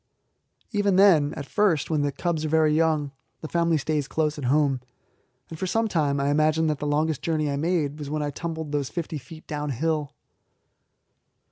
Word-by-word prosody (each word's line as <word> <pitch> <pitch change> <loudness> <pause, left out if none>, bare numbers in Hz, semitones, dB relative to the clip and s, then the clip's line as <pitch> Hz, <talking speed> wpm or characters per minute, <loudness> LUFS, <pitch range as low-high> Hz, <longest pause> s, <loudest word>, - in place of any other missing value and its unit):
Even 205 -3 +2
then 175 -7 +5
at 140 - -6
first, 170 -5 +1
when 155 -2 +2
the 145 0 0
cubs 160 +1 -2
are 155 - -1
very 155 -1 +3
young, 155 -3 +1 0.3
the 155 - -5
family 170 0 +1
stays 150 -1 -1
close 155 -1 -1
at 135 - -4
home, 135 -1 +2 0.7
and 160 - -7
for 190 - -2
some 225 +4 +1
time 145 -7 0
I 140 +1 +1
imagine 155 +2 +2
that 150 -2 -1
the 150 - -3
longest 150 0 0
journey 155 -3 0
I - - -1
made 155 -1 -1
was 145 -2 -6
when 150 0 -1
I 145 - -2
tumbled 160 0 -5
those 145 -3 -1
fifty 165 -3 -4
feet 155 +5 -13
downhill. 150 +1 -2
155 Hz, 190 wpm, -25 LUFS, 145-165 Hz, 0.7 s, then